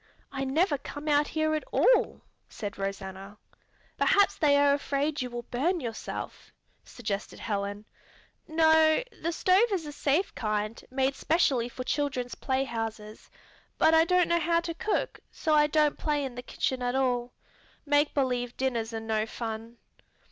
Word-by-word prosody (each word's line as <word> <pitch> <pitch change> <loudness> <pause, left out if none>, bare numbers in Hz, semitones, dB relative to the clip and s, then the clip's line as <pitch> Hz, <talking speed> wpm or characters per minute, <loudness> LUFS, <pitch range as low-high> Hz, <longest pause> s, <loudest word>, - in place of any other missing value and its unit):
"I 270 0 -3
never 295 +2 +1
come 290 +2 -8
out 295 0 +3
here 310 0 0
at 310 - -1
all," - - +3 0.3
said 205 -1 -6
Rosanna. 195 0 -5 0.6
"Perhaps 405 0 +4
they 285 -2 +3
are 285 0 +5
afraid 285 +1 -1
you 250 - -3
will 240 0 -6
burn 335 +9 +1
yourself," 230 -6 -6 0.3
suggested 210 -4 -5
Helen. 205 0 -3 0.6
"No, 315 +2 +4 0.2
the 335 - -1
stove 380 +7 +3
is 365 -5 -1
a 295 - -6
safe 295 +6 0
kind, 215 0 -2
made 265 +1 +1
specially 270 -5 +1
for 255 - -6
children's 260 -3 -2
playhouses, 225 -5 -3 0.5
but 320 - +4
I 320 0 +7
don't 360 0 +3
know 340 0 +2
how 335 +1 +2
to 335 0 -4
cook, 415 +6 -2
so 315 - -1
I 300 0 +5
don't 300 -1 +2
play 295 -2 0
in 260 - -6
the 245 - -6
kitchen 255 +1 -2
at 245 +1 -1
all. 250 -2 0 0.5
Make 290 0 +2
believe 250 -3 -1
dinners 235 -4 -1
are - - -2
no 220 -1 -1
fun." 225 +1 -6
270 Hz, 155 wpm, -28 LUFS, 230-310 Hz, 0.6 s, I